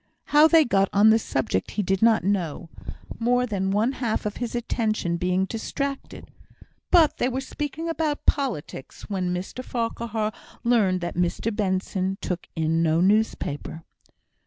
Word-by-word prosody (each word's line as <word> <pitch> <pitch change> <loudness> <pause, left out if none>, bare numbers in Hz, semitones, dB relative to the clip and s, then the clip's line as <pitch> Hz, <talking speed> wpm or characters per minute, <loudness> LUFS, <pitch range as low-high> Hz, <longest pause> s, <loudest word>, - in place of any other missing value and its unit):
How 300 +2 +8
they 320 -1 +5
got 195 -4 +2
on 210 +2 +6
the 225 - +4
subject 110 - -2
he 205 - +2
did 190 +1 0
not 225 -4 +4
know, 175 -4 -2 0.5
more 245 +2 +2
than 195 -5 -2
one 210 +6 +2
half 240 -6 -2
of 210 - -3
his 240 -1 -4
attention 220 -7 -1
being 180 +2 +1
distracted; 275 +6 -5 0.6
but 325 -4 +5
they 250 - +1
were 260 +1 -2
speaking 295 +4 -5
about 315 -2 -2
politics, 240 - -2
when 185 -2 -1
Mr 185 +8 -5
Farquhar 230 -3 -2 0.3
learned 205 -7 +2
that 175 - -3
Mr 180 +5 -1
Benson 190 -1 -1
took 180 -2 -4
in 160 0 +1
no 160 0 +2
newspaper. 180 -6 0
210 Hz, 150 wpm, -25 LUFS, 180-245 Hz, 0.6 s, How